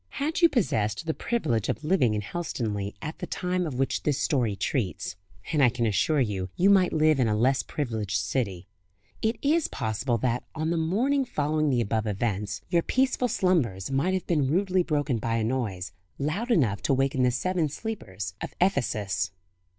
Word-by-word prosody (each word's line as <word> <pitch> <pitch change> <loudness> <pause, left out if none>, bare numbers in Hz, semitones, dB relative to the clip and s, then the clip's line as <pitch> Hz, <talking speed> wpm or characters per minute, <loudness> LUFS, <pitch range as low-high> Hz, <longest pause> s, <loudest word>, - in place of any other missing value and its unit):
Had 310 +5 -1
you 335 - +7
possessed 110 - 0
the 160 - 0
privilege 120 - -1
of - - -2
living 150 - +2
in 105 - -2
Helstonleigh 105 - -3
at 155 - -5
the - - -4
time 180 -1 -1
of 145 - -5
which 135 +1 0
this 145 -3 0
story 125 - +1
treats 100 -2 -2 0.4
and 150 - +3
I 125 - +7
can 120 0 -1
assure 130 - +2
you 100 -7 -1
you 195 +3 +4
might 185 -2 +5
live 155 -2 +3
in 125 - +3
a 105 - +1
less 130 +5 +3
privileged 110 -9 -2
city 95 -1 -2 0.5
it 220 +1 +1
is 310 +3 +3
possible 115 +1 -1
that, 120 +1 0
on 160 +1 -1
the - - +1
morning 225 - +1
following 155 - 0
the 125 -3 +2
above 110 0 -1
events, 105 -1 -2
your 170 -1 +2
peaceful 255 +4 +1
slumbers 140 - +1
might 160 +8 +1
have 185 - -2
been 150 -6 +1
rudely 185 +3 +2
broken 145 -7 0
by 115 +1 -1
a 115 - 0
noise, 110 -7 -2 0.3
loud 165 - -2
enough 120 - +2
to 135 - +2
waken 135 0 +1
the 125 - +4
seven 160 +6 0
sleepers 105 - -5
of - - -6
Ephesus. 105 - +1
135 Hz, 185 wpm, -27 LUFS, 110-175 Hz, 0.5 s, you